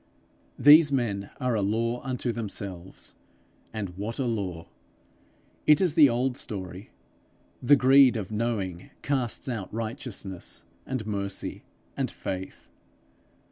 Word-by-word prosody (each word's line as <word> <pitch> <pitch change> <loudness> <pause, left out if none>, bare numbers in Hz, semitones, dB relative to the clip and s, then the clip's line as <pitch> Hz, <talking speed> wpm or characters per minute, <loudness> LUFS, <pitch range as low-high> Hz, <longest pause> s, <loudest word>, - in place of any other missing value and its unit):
These 150 +1 +8
men 105 -7 -1
are 125 -1 0
a 110 - +1
law 115 +4 0
unto 125 -2 -2
themselves 100 -5 -6 0.6
and 105 -4 -4
what 105 +5 -5
a 135 - -1
law! 95 -8 -3 1.0
It 150 -1 +7
is 180 -5 +2
the 155 -4 +7
old 125 +2 0
story: 95 0 -5 0.7
the 140 +3 +6
greed 130 -1 +6
of 105 -1 -5
knowing 105 -6 -2
casts 130 -5 -1
out 115 -7 -4
righteousness, 110 -4 -5 0.2
and 130 -5 -3
mercy, 100 -2 -3 0.3
and - - -1
faith. 95 0 -6
115 Hz, 120 wpm, -27 LUFS, 100-130 Hz, 1.0 s, These